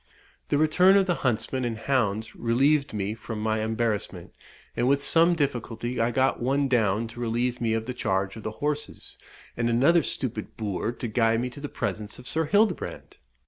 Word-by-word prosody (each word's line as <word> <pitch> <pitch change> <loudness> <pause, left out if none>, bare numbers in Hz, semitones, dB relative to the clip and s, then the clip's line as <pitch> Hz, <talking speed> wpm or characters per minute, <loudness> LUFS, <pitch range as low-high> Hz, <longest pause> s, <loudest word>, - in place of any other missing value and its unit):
The 145 - +1
return 180 +6 +5
of 195 - +4
the 180 - +1
huntsmen 130 +1 -1
and 115 -2 -2
hounds 110 -4 -1
relieved 140 +5 +2
me 105 -1 -2
from 110 -1 -7
my 110 0 0
embarrassment, 110 -5 -2 0.4
and 120 - +1
with 140 +1 +2
some 170 +3 +4
difficulty 120 -4 -2
I 115 - +2
got 130 +2 +1
one 135 +3 +1
down 115 -3 +1
to 115 - -11
relieve 120 +1 -1
me 115 -1 +1
of 110 0 -1
the 125 - -4
charge 95 -5 -1
of 110 - -8
the 110 - -3 0.2
horses, 150 0 -4 0.4
and 120 0 0
another 140 +9 +4
stupid 120 -6 -4
boor 105 0 -2
to 120 0 -5
guide 115 0 +2
me 125 0 -3
to 140 - -11
the 145 - -5
presence 105 -1 -4
of 125 - -10
Sir 160 0 0
Hildebrand. 205 +3 0
120 Hz, 185 wpm, -26 LUFS, 110-140 Hz, 0.4 s, return